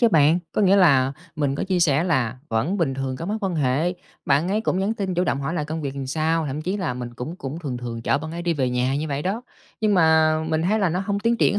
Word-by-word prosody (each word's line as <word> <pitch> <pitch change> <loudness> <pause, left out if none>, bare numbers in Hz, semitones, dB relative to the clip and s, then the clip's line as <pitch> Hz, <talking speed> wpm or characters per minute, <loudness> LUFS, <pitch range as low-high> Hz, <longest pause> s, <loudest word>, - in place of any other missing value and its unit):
chứ 235 - +6
bạn, 160 -3 +4
có 210 - +1
nghĩa 195 +1 +5
là 135 -8 +5 0.2
mình 140 -2 0
có - - -2
chia 185 -2 0
sẻ 155 0 +3
là 130 -8 0
vẫn 115 - 0
bình 160 -8 0
thường 130 -1 -3
cái 165 - -6
mối 210 +3 -1
quan 190 -4 -1
hệ, 150 +4 +1 0.3
bạn 145 +5 +2
ấy 210 +3 +1
cũng 185 - 0
nhắn 200 +4 0
tin 195 -4 -2
chủ 180 +1 +1
động 140 - 0
hỏi 150 +5 -2
là 150 - -1
công 160 +1 -4
việc 140 -2 -4
làm 135 -1 -4
sao, 160 +3 0
thậm 145 +3 -4
chí 185 +4 -1
là 170 -11 -2
mình 120 -1 -6
cũng 150 +9 -6
cũng 135 +1 -6
thường 140 -7 -4
thường 120 -1 -6
chở 135 - +2
bạn 160 +1 -6
ấy 170 +1 -5
đi 170 -1 0
về 130 -3 0
nhà 125 +2 0
như 155 +2 -2
vậy 140 0 -2
đó. 205 +8 -2 0.4
Nhưng 215 -2 +3
mà 160 -2 +4
mình 160 0 0
thấy 210 +5 +2
là 195 -4 +2
nó 175 +3 -1
hông 200 +1 -1
tiến 230 +2 +2
triển 205 - +3
160 Hz, 290 wpm, -23 LUFS, 135-185 Hz, 0.4 s, chứ